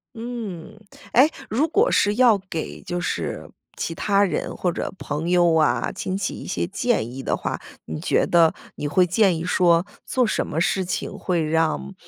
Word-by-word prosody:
嗯。 225 -8 -6 0.4
诶， 270 +5 +6 0.2
如 270 +9 +1
果 425 +9 +2
是 205 0 +3
要 235 -3 +5
给 160 - -5
就 175 0 -4
是 175 - -3 0.3
其 165 - -3
他 200 -1 +2
人 195 - -2
或 180 - 0
者 - - -4
朋 155 +4 -3
友 175 -2 +4
啊、 155 -2 +2
亲 185 0 -3
戚 190 -2 -2
一 - - -8
些 185 - -1
建 195 - 0
议 135 - -6
的 - - 0
话， - - -4 0.2
你 80 -1 -5
觉 - - +2
得 165 -2 +4 0.2
你 145 - -3
会 180 +5 +3
建 185 -1 +3
议 160 - -4
说 175 -1 +3 0.2
做 255 -2 +1
什 - - 0
么 160 - -3
事 190 +3 +1
情 175 - -3
会 175 -3 0
让， 155 - 0
180 Hz, 200 characters per minute, -23 LUFS, 165-210 Hz, 0.4 s, 诶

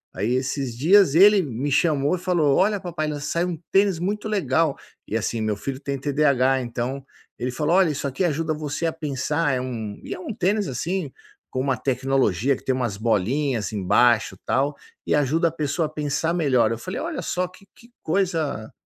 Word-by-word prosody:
Aí 105 +6 0
esses 130 -2 -2
dias 175 +2 +5
ele 200 +2 +7
me 140 -2 -3
chamou 145 +1 +2
e - - -6
falou: 170 -6 +2
"Olha, 205 +1 +2
papai, 170 -4 -3
saiu 170 +5 -1
um 170 - -4
tênis 195 -3 +3
muito 205 +4 -2
legal". 160 -6 +1 0.3
E 110 - -1
assim, 115 +1 -2
meu 110 -2 -1
filho 135 +5 -5
tem 140 -1 -3
TDAH, 135 -2 +2
então 125 +2 -4 0.4
ele 125 +1 -2
falou: 150 +6 0
"Olha, 190 -3 +4
isso 145 -1 -2
aqui 140 +7 -2
ajuda 160 -1 0
você 150 +1 -3
a 165 - 0
pensar". 150 -1 -1
É 125 - 0
um 115 -5 -5
e - - -5
é - - -8
um 220 - -5
tênis, 200 +1 0
assim, 160 +4 -3 0.4
com 130 - -3
uma 130 -2 0
tecnologia 130 -2 +1
que - - -13
tem 130 - +1
umas 120 -6 -2
bolinhas 115 +3 0
embaixo, 110 +3 +3
tal, 140 +2 +1 0.3
e - - +2
ajuda 150 +4 +2
a - - -11
pessoa 155 0 -1
a - - -11
pensar 155 +2 -1
melhor. 130 -9 +2
Eu 115 - -2
falei: 185 - -5
"Olha 325 -3 -3
só, 180 0 -1
que 185 +2 -18
que 235 +1 -19
coisa" 160 - -1
145 Hz, 195 wpm, -23 LUFS, 130-170 Hz, 0.4 s, ele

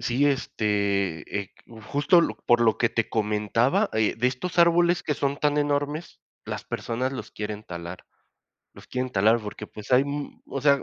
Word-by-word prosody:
sí, 125 +4 +1
este, 100 - 0
eh, 95 - -16
q 115 -1 -13
justo 145 +9 +3
lo - - -1
por 120 0 +5
lo 110 -2 +3
que 120 - +3
te 115 -1 -1
comentaba, 110 - +1
eh, 110 -1 +1
de 120 +2 +1
estos 150 +9 -3
árboles 170 0 +4
que 150 - -1
son 140 -1 -1
tan 150 0 +1
enormes, 145 +2 -1 0.3
las - - -5
personas 125 +3 -3
los 110 -5 -6
quieren 105 0 -5
talar. 85 -2 -8 0.7
Los - - -14
quieren 130 0 -2
talar, 110 +4 +4
porque, 105 0 -7
pues, 105 +4 -8
hay, 125 +1 +6
mm 145 0 -5
O 135 - -4
sea, 140 0 +4
120 Hz, 185 wpm, -25 LUFS, 105-145 Hz, 0.7 s, hay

